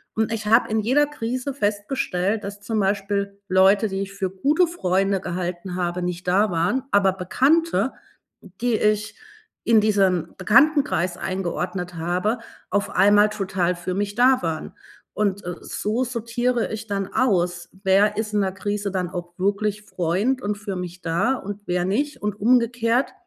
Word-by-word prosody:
und 220 0 0
ich 220 -1 -3
habe 230 +3 +4
in 220 0 +1
jeder 260 +7 +3
Krise 255 -1 -4
festgestellt, 205 -3 -1
dass 205 +1 -7
zum 220 +1 -2
Beispiel 200 0 -1
Leute, 195 +3 +4
die 195 0 -3
ich 195 0 -9
für 195 -1 -2
gute 285 - +2
Freunde 195 - 0
gehalten 180 0 -4
habe, 180 0 -2
nicht 180 0 -4
da 200 +3 +3
waren, 175 +10 0
aber 195 -1 +4
Bekannte, 270 - +1 0.5
die 220 +5 -2
ich 210 0 0 0.5
in 225 -2 +5
diesem 190 -5 +1
Bekanntenkreis 220 - +3
eingeordnet 180 -1 -3
habe, 180 +8 -1 0.3
auf 200 0 0
einmal 205 +1 +5
total 190 -3 -1
für 175 +1 -4
mich 205 +1 -2
da 255 +2 +4
waren. 160 -2 -3 0.4
Und, 200 -1 0
äh, 180 -1 -4
so 220 +5 -2
sortiere 240 0 -1
ich 220 +1 -6
dann 195 -1 -3
aus, 175 -7 +1
wer 205 +2 +3
ist 215 -1 -2
in 210 - +2
der 190 -1 0
Krise 205 +1 -3
dann 180 -2 -2
auch 175 -1 -6
wirklich 205 +2 -1
Freund 200 +9 -1
und 205 -2 -2
für 205 -2 -5
mich 180 0 -6
da 175 +10 +1
und 205 -2 -7
wer 180 0 0
nicht, 285 +10 -1
und 210 0 -2
umgekehrt 235 +2 +2
200 Hz, 160 wpm, -23 LUFS, 185-225 Hz, 0.5 s, in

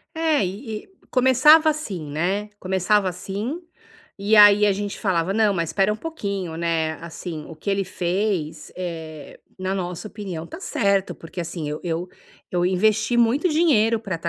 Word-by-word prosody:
É, 320 -8 +2
e 215 +4 -5
e - - -22 0.2
começava 260 +5 +6
assim, 195 - -5
né, 190 +8 -1
começava 190 +2 +1
assim, 200 - -4 0.6
e 205 +2 +2
aí 205 0 +8
a 205 - +4
gente 200 +1 -4
falava: 185 -3 0
"Não, 215 -1 +3
mas 170 -3 -1
espera 195 +1 +2
um 215 - -4
pouquinho, 200 - -4
né, 165 -2 0
assim, 165 -1 -7
o 165 - -10
que 160 +6 -4
ele 195 0 0
fez, 180 -4 -2
eh, 160 -4 -7 0.2
na 185 0 -2
nossa 180 +2 -4
opinião, 190 -7 -6
está - - -9
certo", 200 - 0
porque 165 +2 -8
assim, 165 -2 -4
eu 150 - -4
eu 170 +1 -2 0.4
eu 175 0 +1
investi 215 +5 +2
muito 240 +9 +3
dinheiro 255 -9 +3
para 195 -5 -3
estar 165 +1 -3
195 Hz, 170 wpm, -23 LUFS, 170-220 Hz, 0.6 s, aí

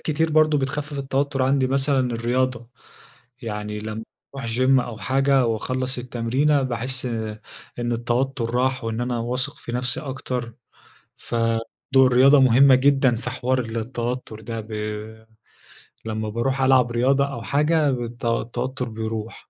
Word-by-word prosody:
كتير 160 +1 0
برضه 155 -1 +4
بتخفف 145 +2 -3
التوتر 135 0 -1
عندي، 135 0 +2
مثلًا 135 +1 +1
الرياضة. 120 0 -1 0.7
يعني 105 -2 -4
لمّ 110 +1 -5 0.3
اروح 135 -4 -5
gym 130 +1 +4
أو 120 -3 -5
حاجة 135 +3 +2
وأخلّص 130 +3 -2
التمرينة، 125 +4 +1
باحس 130 +1 -3 0.7
إن 120 0 -1
التوتر 120 +1 -1
راح، 130 0 +1
وإن 115 +1 -2
أنا 120 -1 -1
واثق 125 +2 -2
في 120 - -8
نفسي 125 +1 -1
أكتر. 125 -4 -5 0.6
فدور 115 -1 -1 0.4
الرياضة 130 +3 +6
مهمة 130 +1 +6
جدًا 135 -2 +3
في 120 - -4
حوار 130 +1 -1
التوتر 115 0 -4
ده 115 +1 -5
ب 110 - -14 1.4
لمّا 110 -1 -3
باروح 130 +5 -1
ألعب 130 -2 +4
رياضة 135 +4 +2
أو 120 - -6
حاجة 150 +4 +2
الت 120 -2 -4
التوتر 120 +2 -2
بيروح. 110 0 -6
125 Hz, 130 wpm, -23 LUFS, 115-135 Hz, 1.4 s, الرياضة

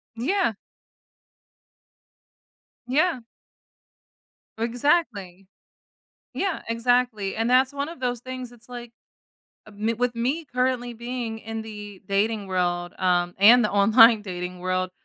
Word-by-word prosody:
Yeah. 330 - 0 2.3
Yeah. 295 +2 +1 1.4
Exactly. 230 - -1 0.9
Yeah. 385 -4 -2
Exactly. 230 -3 0
And 225 +2 -1
that's 260 +2 +3
one 285 +2 -3
of 335 - -10
those 245 -2 -2
things, 255 0 -7
it's 235 0 -19
like, 240 -1 -8 0.8
um, 215 +1 -3
with 245 0 0
me 260 +8 -1
currently 250 -2 -1
being 235 -1 -5
in 225 0 -6
the 210 -3 -9
dating 205 +1 0
world, 175 -1 -1
um, 175 -1 +1
and 230 +5 +7
the 210 - 0
online 220 +2 +6
dating 180 -2 -6
world, 185 0 -1
230 Hz, 110 wpm, -24 LUFS, 200-250 Hz, 2.3 s, and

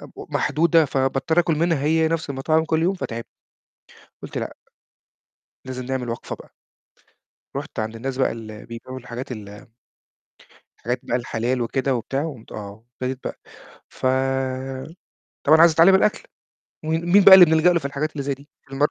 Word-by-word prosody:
ومحدودة 165 0 +2
فباضطر 135 +4 +1
آكل 170 -2 +2
منها 165 -2 +1
هي 160 +1 +3
نفس 165 -1 -2
المطاعم 155 +4 +1
كل 160 0 +1
يوم 185 +3 +2
فتعبت. 115 -10 -5 1.0
قُلت - - -6
لأ، - - -5 1.1
لازم 130 -1 -6
نعمل 130 -2 -3
وقفة 115 - -5
بقى. - - -15 1.1
رُحت - - -6
عند 110 +1 -3
الناس 130 +3 -4
بقى 135 - +2
ال 110 -2 -9
بيبعوا 120 +2 -8
الحاجات 125 +1 -7
ال 105 +2 -10 1.1
الحاجات 125 +2 -3
بقى 120 - -1
الحلال 120 +1 -2
وكده 130 +3 0
وبتاع، 130 +4 -2
و 160 - -3
قومت 115 -5 -14
آه، 105 +1 -9
أبتديت 130 +1 -4
بقى - - -6 0.5
ف - - -5 1.4
طبعًا 155 +2 +6
عايز 170 -1 +7
أتعلم 165 +5 +6
الأكل، 200 +2 +2 0.6
وم 155 - -2
مين 175 +5 +4
بقى 195 -1 +11
اللي 185 -2 +11
بنلجأ 160 +2 +4
له 170 - +2
في 155 - -12
الحاجات 145 +2 -2
اللي 145 - -4
زي 140 0 -2
دي؟ 140 +2 -19 0.2
الم 135 +1 -3
135 Hz, 160 wpm, -22 LUFS, 125-160 Hz, 1.4 s, بقى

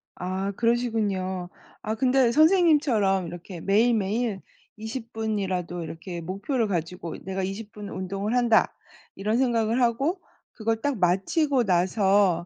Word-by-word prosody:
아 190 +2 -3
그러시군요. 205 -5 -1 0.3
아 215 +1 -2
근데 255 0 +3
선생님처럼 290 - +4
이렇게 175 +1 -8
매일매일 215 0 +1 0.4
20 220 -1 -4
이라도 180 -3 -3
이렇게 170 +2 -7
목표를 205 - -2
가지고 170 -2 -4
'내가 190 0 -3
20 205 +1 -6
운동을 195 +5 -3
한다.' 240 -3 +3 0.4
이런 215 +3 0
생각을 235 -2 +1
하고 275 +10 +1 0.3
그걸 225 0 -2
딱 285 -1 -1
마치고 245 - +2
나서 190 -1 +2
210 Hz, 265 characters per minute, -25 LUFS, 185-235 Hz, 0.4 s, 선생님처럼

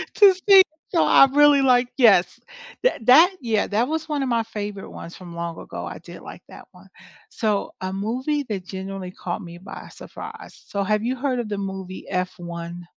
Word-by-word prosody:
to 400 -2 +7
see 390 -1 +9 0.3
so 340 - +2
I - - +7
really 290 -1 +6
like 250 -2 +3
yes, 195 -8 +4 0.4
that - - 0
that 335 +9 +7
yeah, 225 -4 0
that 230 +6 0
was 320 0 -3
one 290 -3 -2
of 260 - -2
my 230 -1 +1
favorite 205 -3 -6
ones 170 - -10
from 175 -2 -11
long 170 -1 -5
ago, - - -7
I - - -7
did - - -12
like - - -11
that - - -13
one. - - -18 0.4
So, 210 -4 -2
a 185 0 -3
movie 255 +9 -2
that 200 -7 -5
genuinely 190 -1 -7
caught 180 +2 -5
me 170 -1 -10
by 195 +2 -10
surprise, - - -11
so 200 -1 -2
have 215 +2 0
you 255 +2 -2
heard 255 -1 -1
of 230 -3 -4
the 205 - -3
movie 190 -1 -6
F1? 175 -2 -5
210 Hz, 195 wpm, -23 LUFS, 185-260 Hz, 0.4 s, see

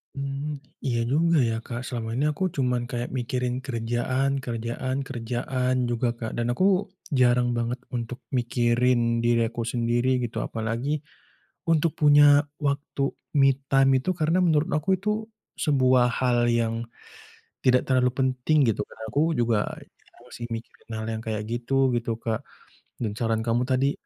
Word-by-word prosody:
Mmm, 140 +1 -4 0.2
iya 120 -3 0
juga 165 +3 +3
ya 115 - -1
Kak 120 0 -5
selama 115 -3 -4
ini 135 +4 +1
aku 150 - -4
cuma 125 -3 +1 0.2
kayak 120 0 -3
mikirin 125 0 -1
kerjaan 120 +2 -1
kerjaan 120 +2 -3
kerjaan 125 +1 -2
juga 120 +1 0
Kak, 110 - -4
dan 120 0 0
aku 185 +10 +1 0.5
jarang 120 0 +4
banget 120 +2 -2 0.2
untuk 120 +1 -4 0.2
mikirin 120 +1 +2 0.2
diri 120 -1 +3
aku 115 +1 -4
sendiri 120 +1 0
gitu 115 - -4
apalagi 115 +7 -2 0.7
untuk 165 0 +3
punya 145 -1 +7 0.3
waktu 140 -1 -2 0.4
me 135 0 +6 0.2
time 135 0 +5
itu 160 - -3
karena 160 +3 +2
menurut 160 -3 +2
aku 155 +4 -4
itu 200 +3 -3 0.6
sebuah 130 -4 +4
hal 120 -2 +2
yang 115 -1 +1 0.9
tidak 125 0 +5
terlalu 125 -1 +4
penting 130 +3 +1
gitu, 110 - -3
karena 110 - -10
aku 140 - +1 0.2
juga 115 -2 +2 0.7
masih 120 -1 -8
mikirin 115 0 -10
hal 110 0 -4
yang 110 - -3
kayak 110 -1 -2
gitu, 130 +3 +1
gitu 115 -1 -2
Kak 110 -2 -2 0.5
dan 110 -4 -3
saran 115 -1 0
kamu 115 +1 +1
tadi, 135 +1 +2
125 Hz, 145 wpm, -25 LUFS, 120-135 Hz, 0.9 s, punya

